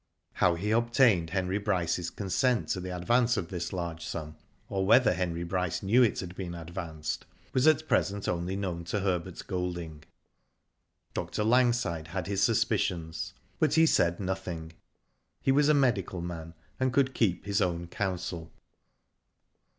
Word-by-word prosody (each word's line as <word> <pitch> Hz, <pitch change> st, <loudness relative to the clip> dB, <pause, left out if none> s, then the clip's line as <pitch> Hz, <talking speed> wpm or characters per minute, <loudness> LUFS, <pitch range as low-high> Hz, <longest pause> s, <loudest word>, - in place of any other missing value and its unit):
How 90 Hz, -2 st, +3 dB
he 100 Hz, +5 st, -2 dB
obtained 115 Hz, -6 st, +3 dB
Heny 95 Hz, +2 st, -1 dB
Bryce^s 90 Hz, -4 st, -1 dB
consent 105 Hz, -, +1 dB
to -, -, 0 dB
the 90 Hz, 0 st, -5 dB
advance 120 Hz, +7 st, +2 dB
of 85 Hz, -, -3 dB
this 85 Hz, -3 st, -4 dB
large 85 Hz, -3 st, -4 dB
sum, 75 Hz, -2 st, -5 dB, 0.3 s
or 100 Hz, -5 st, -1 dB
whether 110 Hz, +3 st, +5 dB
Henry 85 Hz, -1 st, -2 dB
Bryce 90 Hz, 0 st, -2 dB
knew 110 Hz, +6 st, +4 dB
it 115 Hz, -4 st, +3 dB
had 90 Hz, -2 st, -7 dB
been 90 Hz, -2 st, -5 dB
advanced, 85 Hz, -2 st, -5 dB, 0.3 s
was 130 Hz, +3 st, +3 dB
at 155 Hz, 0 st, +4 dB
present 100 Hz, 0 st, +1 dB
known 85 Hz, 0 st, -1 dB, 0.2 s
only 85 Hz, -2 st, -3 dB
to 100 Hz, +4 st, -1 dB
Herbert 90 Hz, -2 st, -1 dB
G'^lding. 85 Hz, -4 st, -4 dB, 1.1 s
Dr. 105 Hz, -, -2 dB
Langside 120 Hz, -9 st, +2 dB
had 90 Hz, +1 st, -4 dB
his 100 Hz, +1 st, -1 dB
suspicions, 85 Hz, -6 st, 0 dB, 0.2 s
but 155 Hz, -3 st, +3 dB
he 160 Hz, 0 st, +6 dB
said 85 Hz, -, +2 dB
nothing. 90 Hz, -4 st, -4 dB, 0.7 s
He 135 Hz, -, +2 dB
was 145 Hz, +2 st, +4 dB
a 150 Hz, -, +5 dB
medical 105 Hz, -10 st, +1 dB
man, 85 Hz, -1 st, -6 dB, 0.2 s
and 130 Hz, 0 st, +2 dB
could 130 Hz, 0 st, +2 dB
keep 100 Hz, -9 st, +1 dB
his 100 Hz, -1 st, +1 dB
own 85 Hz, -1 st, 0 dB
counsel. 90 Hz, -2 st, -4 dB
90 Hz, 150 wpm, -29 LUFS, 85-110 Hz, 1.1 s, he